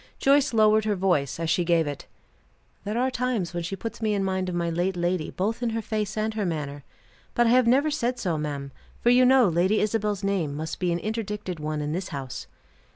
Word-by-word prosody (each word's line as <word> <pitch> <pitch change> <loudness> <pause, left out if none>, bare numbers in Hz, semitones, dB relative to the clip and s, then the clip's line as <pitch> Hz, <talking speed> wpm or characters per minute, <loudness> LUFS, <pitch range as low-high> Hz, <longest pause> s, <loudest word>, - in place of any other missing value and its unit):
Joyce 280 +1 +3
lowered 215 -1 +4
her 210 -1 +1
voice 175 -7 0
as 165 -1 0
she 175 - +2
gave 170 -1 +2
it. 145 -1 -6 0.8
"There 210 +3 -2
are 260 +2 +1
times 235 -9 -1
when 175 - -2
she 170 +4 -4
puts 225 +4 -7
me 215 -1 +1
in 195 - 0
mind 190 -1 -1
of 180 - -3
my 170 -1 0
late 180 +2 -1
lady 175 -2 -1
both 220 +6 -2
in 240 - 0
her 225 0 -2
face 215 -2 -3
and 215 0 -1
manner. 150 -8 -3 0.5
But 240 - +4
I 230 - +4
have 250 -1 +5
never 280 +6 +4
said 250 -4 -1
so, 175 -8 -1
ma'am; 145 -2 -4 0.3
for 240 - +3
you 250 +1 +6
know 255 -3 +6
Lady 180 +5 +2
Isabel's 210 -1 0
name 185 -8 0
must 160 +2 -5
be 180 -2 0
an 170 - +1
interdicted 210 -3 -4
one 150 0 -3
in 150 0 -2
this 185 +3 -3
house." 135 -4 -6
195 Hz, 220 wpm, -26 LUFS, 170-225 Hz, 0.8 s, you